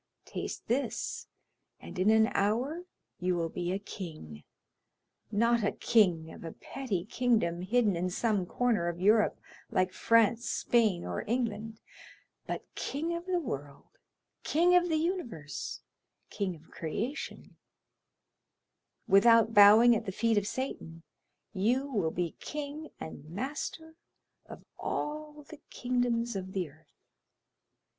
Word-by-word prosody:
taste - - -5
this, 260 +4 -2 0.5
and - - -9
in 190 +3 +4
an 220 0 +6
hour 250 - 0 0.3
you 180 0 +1
will 165 -1 -1
be 175 +1 -3
a 190 - 0
king, 155 - -8 0.9
not 230 +2 +3
a 205 - +2
king 175 -8 +2
of - - -11
a 165 - -6
petty 210 -10 -4
kingdom 215 -8 +1
hidden 210 +1 +2
in 180 +2 -1
some 205 +1 0
corner 215 -1 0
of 175 0 -3
Europe 210 +3 +3 0.3
like 185 0 +1
France, 230 +1 +3
Spain, 220 -7 +2
or 90 -1 -3
England, 225 -2 -2 0.7
but - - -4
king 325 +5 -3
of 340 +2 -6
the 370 -1 +1
world, 145 - -7 0.4
king 345 +4 +3
of 355 0 +4
the 320 - +2
universe, 245 - -3 0.5
king 190 -3 -2
of 160 0 -19
creation; 225 - -5 1.5
without 225 +3 +6
bowing 220 +3 +8
at 220 -1 -3
the - - -1
feet 225 +3 +1
of 205 -1 +1
Satan, 165 -11 -5 0.5
you 235 +8 +1
will 210 -12 0
be 170 0 -3
king 300 +1 -6
and 155 -1 -8
master 295 - -5 0.5
of - - -11
all 300 0 -4
the 310 -2 -12
kingdoms 245 -2 0
of 190 0 -5
the 180 -6 -2
earth. 155 +1 -26
220 Hz, 130 wpm, -30 LUFS, 180-255 Hz, 1.5 s, bowing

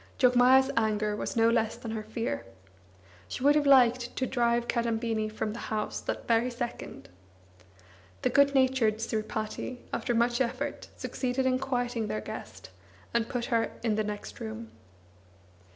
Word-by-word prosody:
Jogmaya's 255 +1 +5
anger 215 -2 +1
was - - -4
no 225 0 +4
less 230 -1 +2
than 225 - -7
her 220 -1 -3
fear. 220 +2 -3 0.8
She 250 - -5
would 290 +1 +6
have 295 -1 +2
liked 250 -3 +5
to 260 - 0
drive 240 -1 +1
Kadambini 225 -2 0
from 215 0 -3
the 235 - -7
house 215 -1 -2
that - - -4
very 235 +1 +3
second. 240 -1 -6 1.2
The - - +2
good 280 0 +4
natured 260 -5 +3
Sripati, 220 +2 -3 0.2
after 240 - -1
much 240 +2 +2
effort, 260 +3 -2
succeeded 260 0 -2
in 255 0 +2
quieting 245 -4 -1
their 110 - -2
guest, 105 - -8 0.4
and 235 -1 +1
put 240 -1 -2
her 230 -1 +1
in 225 -2 +2
the 215 +1 0
next 210 0 -6
room. 225 0 -7
235 Hz, 150 wpm, -29 LUFS, 220-255 Hz, 1.2 s, would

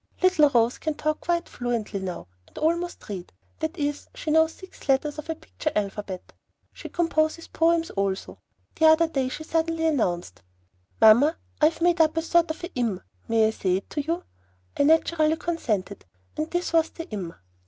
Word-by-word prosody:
Little 365 -6 +5
Rose 235 -2 +2
can 310 -1 -2
talk 310 +1 -1
quite 345 0 0
fluently 235 -4 -3
now, 185 -2 -5 0.2
and - - -20
almost 340 +3 -1
read; 190 -4 -6 0.3
that 315 +3 -3
is, 290 0 -2
she 310 - -3
knows 320 +1 +4
six 375 -6 -14
letters 290 +3 +1
of 305 - -8
her 325 - -2
picture 320 -1 -4
alphabet. 200 -2 -4 0.4
She - - -9
composes 330 -1 0
poems 330 0 +2
also. 195 -1 -2 0.4
The 320 - +5
other 315 +1 +6
day 270 -5 -1
she 310 - -6
suddenly 325 0 0
announced, 175 - 0 0.6
"Mamma, 250 +9 +6 0.2
I - - +7
have 325 +1 -3
made 345 -1 +4
up 315 0 +3
a 325 - +1
sort 340 0 +3
of 315 - -5
a 345 - -6
im. 230 -7 -1 0.3
May 225 -1 +3
I 220 - +2
say 185 -4 0
it 195 - -9
to 295 - -1
you?" 335 +5 -2 0.5
I 285 - +2
naturally 320 0 +3
consented, 225 - -2 0.3
and 310 +1 -2
this 350 -1 -2
was 325 -1 +4
the 330 - -8
IM. 180 -5 -5
310 Hz, 185 wpm, -25 LUFS, 225-330 Hz, 0.6 s, I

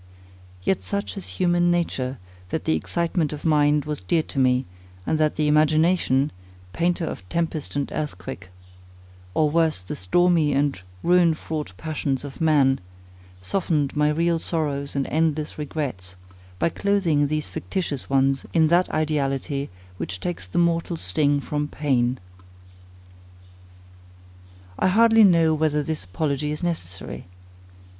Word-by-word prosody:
Yet 190 - +1
such 200 +1 -3
is 195 - -6
human 175 -1 +3
nature, 140 -7 -1 0.3
that - - -3
the 80 - +2
excitement 165 - -1
of 150 - -8
mind 150 -2 +3
was 150 -1 -3
dear 160 - +1
to 140 - -5
me, 130 0 +3 0.4
and 155 - 0
that 155 -1 +2
the 155 -1 +1
imagination, 155 -1 +3 0.4
painter 170 0 0
of 95 -11 -7
tempest 165 -1 -2
and 140 -1 0
earthquake, 135 -9 -5 0.9
or, 155 -1 +3
worse, 165 - +2
the 90 - -5
stormy 160 - +3
and 140 -6 0 0.2
ruin 175 -2 +4
fraught 155 -8 -5
passions 145 -3 -2
of 140 +3 -9
man, 145 -4 +4 0.6
softened 150 - -1
my 150 0 +3
real 165 +2 +1
sorrows 145 -4 -2
and 140 -1 0
endless 155 -1 -1
regrets, 135 -12 -4 0.4
by 170 - +1
clothing 170 -8 +1
these 155 +1 -2
fictitious 170 -8 -4
ones 135 0 +2
in 160 -2 +5
that 175 +2 +3
ideality, 140 -2 -1 0.3
which 95 +1 -4
takes 90 -1 -4
the 90 - -5
mortal 170 0 +1
sting 145 - +1
from 150 +1 -2
pain. 130 -4 0 2.6
I - - +3
hardly 225 +3 +6
know 165 -5 +5
whether 150 -1 +1
this 155 -3 -3
apology 140 - -2
is 150 +3 -5
necessary. 95 - -4
150 Hz, 135 wpm, -24 LUFS, 135-165 Hz, 2.6 s, hardly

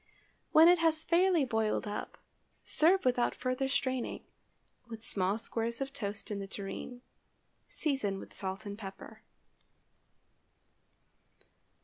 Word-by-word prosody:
When 320 +2 +8
it 350 0 +6
has 320 -1 +2
fairly 345 -2 +3
boiled 220 -3 0
up, 205 0 -5 0.5
serve 355 +3 +3
without 245 -1 +2
further 255 +1 -1
straining, 260 -2 -1 0.6
with 225 -1 -8
small 195 +1 +1
squares 230 +1 -3
of 270 0 -4
toast 210 -2 -4
in 205 - -2
the 195 - -5
tureen. 210 +6 -7 0.6
Season 265 -11 -1
with - - -10
salt 190 +2 -4
and 200 0 -5
pepper. 195 -2 -9
240 Hz, 115 wpm, -32 LUFS, 205-280 Hz, 0.6 s, When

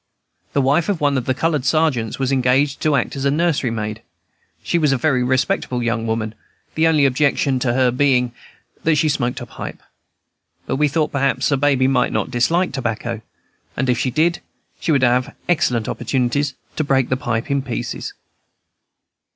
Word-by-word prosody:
The 140 - +2
wife 145 +8 +2
of 195 -5 0
one 145 -1 +2
of 130 -2 -1
the 130 - 0
colored 155 -2 0
sergeants 140 -6 +1
was 135 0 -1
engaged 135 +2 +2
to 155 -2 +2
act 135 - -1
as 135 - -4
nursery 145 -2 +1
maid. 110 -1 -4 0.6
She 170 - +1
was 150 -3 +2
a 135 - +2
very 130 -1 +1
respectable 130 0 0
young 115 -1 -1
woman; 110 -1 -2 0.4
the 160 +1 +3
only 155 -3 +4
objection 140 0 +2
to 125 -2 0
her 130 -1 +3
being 125 -2 +2 0.5
that 160 -1 +3
she 150 +1 +2
smoked 125 -3 -1
a - - -5
pipe. - - -8 0.9
But 130 - -2
we 150 +1 +3
thought 150 +2 0
that 140 - -1
perhaps 140 +2 +1
Baby 135 -2 +2
might 125 -2 +2
not - - -2
dislike 165 +10 +1
tobacco; 115 -3 -3 0.6
and 130 0 +1
if 120 - 0
she 130 - 0
did, 160 +7 +1 0.4
she 165 - -1
would 140 -4 +3
have 125 0 +2
excellent 125 -9 +1
opportunities 135 +2 -1 0.2
to 155 - +1
break 135 -3 +1
the 130 - +2
pipe 120 -2 -2
in 140 0 +1
pieces. 120 -2 -5
135 Hz, 180 wpm, -20 LUFS, 125-145 Hz, 0.9 s, only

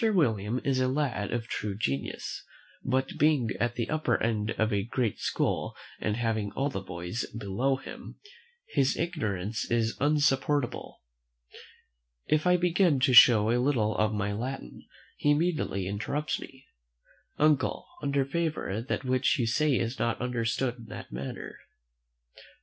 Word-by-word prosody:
William 125 - +2
is 135 -2 +1
a 130 - +2
lad 130 -7 -1
of 120 -1 -2
true 105 -3 -4
genius; 70 -8 -3 0.4
but, 130 +1 -1
being 145 -6 +3
at 120 0 0
the 115 - -2
upper 155 -6 +1
end 110 -2 0
of 110 0 +1
a 100 - +2
great 115 +1 -1
school, - - -1 0.2
and 105 0 -1
having 110 -3 -1
all 140 +1 -1
the 95 - -3
boys 90 +3 -4
below 115 +6 0
him, 135 - -9 0.5
his 135 -1 +2
arrogance 110 - -2
is 115 -1 +1
insupportable. 145 -2 +1 1.2
If 155 +3 +1
I 180 0 +5
begin 175 -4 +3
to 130 -1 +3
show 115 -3 +8
a 120 +1 +2
little 115 -6 +1
of 110 -1 +2
my 105 -1 -1
Latin, 125 - -6 0.3
he 145 - +1
immediately 145 - +1
interrupts: 105 +10 -2 1.0
"Uncle, 150 -2 +2 0.2
under 140 -1 +1
favour, 150 - -2
that 130 - -3
which 130 +1 +2
you 120 - +1
say 135 +4 +2
is 115 +3 -2
not 115 0 0
understood 125 +1 -1
in 115 - -11
that 105 - -9
manner." 65 +2 -6
120 Hz, 145 wpm, -29 LUFS, 110-145 Hz, 1.2 s, show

